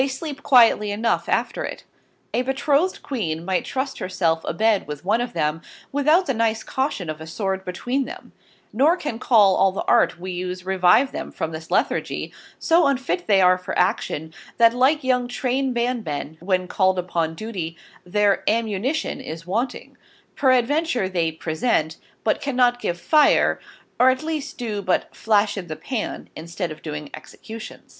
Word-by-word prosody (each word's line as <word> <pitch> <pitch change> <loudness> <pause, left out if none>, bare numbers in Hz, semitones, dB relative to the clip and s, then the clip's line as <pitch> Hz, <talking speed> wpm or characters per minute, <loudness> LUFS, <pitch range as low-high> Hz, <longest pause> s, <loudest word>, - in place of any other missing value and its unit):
3>> 270 - +1
sleep 285 +1 -6
quietly 230 -5 +5
enough 220 +3 0
after - - 0
it. - - -6 0.5
A 245 - +2
Betrothed 280 +7 0
Queen 170 - -3
migh 185 -1 0
trust 270 +1 -3
her 185 - -4
self 165 -3 +1
a - - -1
bed 215 +3 +1
with 150 +2 -7
one 220 +5 +2
of 245 - -4
them, 155 -1 -1 0.3
without 305 +6 +3
the 270 - 0
nice 225 -1 0
Caution 265 - -2
of 155 0 -5
a 160 - -8
Sword 190 +2 -3
between 245 +9 -2
them: 365 +6 -10 0.4
nor 295 +10 +4
can 295 -10 -4
all 195 -5 +5
the 190 - -4
Art - - +3
we 185 +1 -5
use 180 0 -5
revive 190 +8 +4
them - - -6
from 160 - -4
this 160 +1 -8
Lethargy, - - -1 0.2
so 335 -1 +3
unfit 275 +6 -1
they 200 -3 +5
are 185 0 +5
for 180 +1 -5
Action, 160 -3 0 0.2
that 230 0 +6
like 265 +5 +2
young 250 -1 +1
Train 260 +2 -1
band 240 -1 -1
men 150 -1 -5
when 185 0 0
called 190 0 +2
upon 170 -3 -1
Duty, 175 -5 -5 0.3
their 200 +2 +1
Amunition 225 +6 -1
is 165 +1 -7
wanting; 225 +8 -3 0.4
peradventure 260 - +2
they 170 -3 0
Present, 160 0 -1 0.3
but 215 - +1
cannot 250 -3 +2
give 175 0 -2
Fire, 305 - +4 0.4
or 255 - +7
at 260 +3 0
least 310 -3 -4
do 220 -5 -3
but 185 -2 -1
flash 210 -1 +2
in 180 - -8
the 155 - -5
pan, 230 - -4
instead 170 +2 -5
of 155 - -9
doing 150 -2 -6
Execution. 220 0 -10
215 Hz, 170 wpm, -22 LUFS, 180-260 Hz, 0.5 s, or